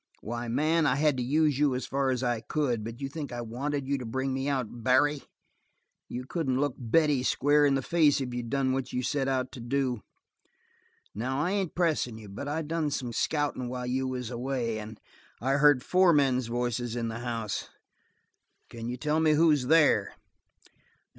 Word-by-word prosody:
Why, 120 +2 -4
man, 155 +6 +2
I 130 - +2
had 150 0 +2
to 125 - -1
use 145 +1 +2
you 145 -3 +3
as 125 - -3
far 135 0 0
as 130 -1 -1
I 120 -2 0
could. 125 -4 -1
But 115 +4 -7
you 135 - -2
think 145 0 -6
I 120 0 -4
wanted 135 +4 -3
you 140 0 0
to - - -6
bring 130 +3 -2
me 135 +1 -2
out 125 -4 -3
Barry? 140 +3 +3 0.9
You 125 +1 -5
couldn't 135 -4 -1
look 145 -2 +1
Betty 140 +3 +2
square 145 +3 +3
in 140 - +2
the 135 - -1
face 155 -3 +3
if 125 -2 -4
you'd 120 -1 -4
done 135 0 +1
what 130 -1 -3
you 125 - -2
set 135 +1 0
out 130 -1 -1
to 135 - -9
do. 125 -1 -1 1.1
Now, 130 +5 -2
I 175 +5 0
ain't 195 -4 -1
pressin' 155 -10 0
you, 105 -2 -11
but 100 +8 -6
I 155 +3 -2
done 155 0 -1
some 125 -4 -3
scouting 145 -2 -1
while 125 0 -4
you 130 +1 -1
was 125 -2 -4
away, 120 -2 -2
and 110 +1 -9 0.4
I 135 +4 +1
heard 145 -3 +5
four 185 -1 +4
men's 130 -4 +2
voices 120 0 -2
in 115 -1 -2
the 110 +1 -5
house. 115 -4 -3 1.0
Can 115 0 -6
you 125 - -4
tell 150 +4 0
me 160 -1 +4
who's 150 -4 +3
there?" 150 -10 +4
130 Hz, 195 wpm, -28 LUFS, 120-145 Hz, 1.1 s, heard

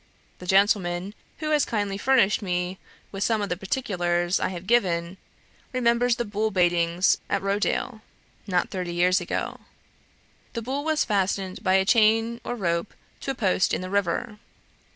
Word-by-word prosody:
The 180 - -10
gentleman, 190 -1 +2 0.2
who 310 -1 -3
has 300 -2 +4
kindly 205 -3 -1
furnished 235 -5 +3
me 180 -1 -2 0.3
with 195 0 -3
some 225 0 +1
of 200 - -3
the 180 - 0
particulars 175 -4 -1
I - - 0
have 180 -1 -7
given, 185 -6 +1 0.6
remembers 240 -1 +2
the 240 - -2
bull 210 +1 -1
baitings 175 -1 +2
at 200 -1 0
Rochdale, 205 +3 -1 0.5
not 180 -3 0
thirty 180 -2 -4
years 180 +1 +3
ago. - - -3 0.9
The 230 - -4
bull 270 +4 -3
was 315 -1 +1
fastened 195 -2 -1
by 190 -2 +3
a 190 0 +3
chain 225 +2 +3
or 245 - -3
rope 170 -3 -2 0.2
to - - -6
a 270 - -1
post 190 -5 +1
in - - -4
the 185 0 -6
river. 200 +3 -1
195 Hz, 160 wpm, -25 LUFS, 180-230 Hz, 0.9 s, has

